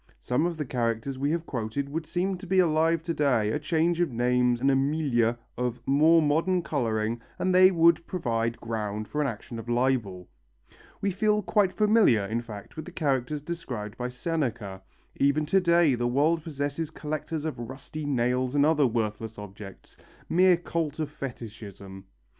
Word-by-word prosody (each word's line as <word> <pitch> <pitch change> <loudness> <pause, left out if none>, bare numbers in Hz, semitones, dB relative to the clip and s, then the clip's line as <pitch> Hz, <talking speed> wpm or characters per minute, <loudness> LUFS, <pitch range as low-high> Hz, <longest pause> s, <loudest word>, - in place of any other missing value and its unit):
Some 125 +7 0
of 170 -2 -4
the 150 - -3
characters 120 +1 -2
we 140 +2 0
have 165 +1 -1
quoted 125 +2 -3
would 155 +2 -4
seem 185 +2 -1
to 195 - -10
be 190 +2 +1
alive 165 -2 +3
to 170 - -2
day, 125 -9 +2
a 150 - -1
change 165 +2 +1
of 175 - +1
name 125 +1 +2
and 135 +2 +3
a - - +3
milieu 135 -5 +1 0.2
of 125 0 -1
more 155 +4 +5
modern 165 +5 +1
colouring 115 -5 -1 0.2
and 185 - 0
they 185 +1 +8
would 170 -2 +3
provide 115 -9 -1
ground 110 -2 -4
for 150 - -2
an 145 - +1
action 115 0 -6
for 120 +2 -6
libel. 120 -8 0 0.7
We 200 - +1
feel 210 +2 +1
quite 200 -1 +2
familiar, 210 - +4
in 110 +4 -2
fact, 105 -4 -10
with 155 - -6
the 180 - -9
characters 145 -3 -1
described 130 -11 -5
by 125 0 -3
Seneca. 125 - -3 0.4
Even 140 +2 +2
to 190 +5 +3
day 170 -4 +4
the 120 0 0
world 150 +6 +2
possesses 145 0 -3
collectors 155 0 -4
of 150 -6 -4
rusty 130 +5 -7
nails 125 0 0
and 145 0 +4
other 150 -3 +4
worthless 110 -1 -3
objects 100 -1 -11 0.3
mere 180 +1 +5
cult 165 -3 -3
of 155 -2 -3
fetishism. 105 -8 -8
140 Hz, 175 wpm, -27 LUFS, 115-165 Hz, 0.7 s, they